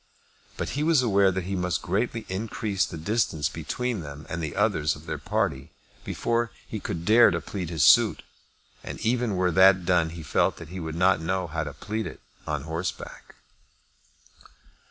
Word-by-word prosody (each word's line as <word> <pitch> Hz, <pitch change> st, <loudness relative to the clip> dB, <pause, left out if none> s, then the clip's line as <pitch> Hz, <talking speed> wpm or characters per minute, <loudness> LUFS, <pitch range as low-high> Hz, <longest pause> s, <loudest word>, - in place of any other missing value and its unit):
But -, -, -3 dB
he 145 Hz, -, -2 dB
was 155 Hz, -4 st, +3 dB
aware 100 Hz, -4 st, +4 dB
that 95 Hz, 0 st, -2 dB
he 95 Hz, +2 st, -3 dB
must 90 Hz, -1 st, -1 dB
greatly 110 Hz, +6 st, -1 dB
increase 100 Hz, 0 st, -1 dB
the 85 Hz, -, -7 dB
distance 80 Hz, -5 st, 0 dB
between 110 Hz, +9 st, -3 dB
them 75 Hz, -1 st, -9 dB
and 85 Hz, -, -3 dB
the 75 Hz, -3 st, -4 dB
others 75 Hz, -1 st, +1 dB
of -, -, -14 dB
their -, -, -4 dB
party 65 Hz, 0 st, -2 dB, 0.3 s
before 115 Hz, 0 st, -1 dB, 0.2 s
he -, -, -5 dB
could 85 Hz, 0 st, -5 dB
dare 115 Hz, +4 st, +7 dB
to 85 Hz, -3 st, -1 dB
plead 90 Hz, -1 st, -5 dB
his 80 Hz, -5 st, 0 dB
suit, -, -, +5 dB, 0.6 s
and -, -, -7 dB
even 120 Hz, -2 st, 0 dB
were 90 Hz, -1 st, +1 dB
that 95 Hz, +1 st, +5 dB
done 85 Hz, -2 st, +3 dB
he 85 Hz, 0 st, -8 dB
felt 70 Hz, -, +1 dB
that -, -, -10 dB
he 95 Hz, +2 st, -6 dB
would 80 Hz, -2 st, -5 dB
not 90 Hz, -1 st, +3 dB
know 95 Hz, +2 st, -1 dB
how 80 Hz, -1 st, -3 dB
to 75 Hz, -, -6 dB
plead 105 Hz, +10 st, -4 dB
it -, -, -9 dB, 0.3 s
on 75 Hz, -2 st, -2 dB
horseback. 80 Hz, +3 st, -6 dB
90 Hz, 180 wpm, -26 LUFS, 80-105 Hz, 0.6 s, dare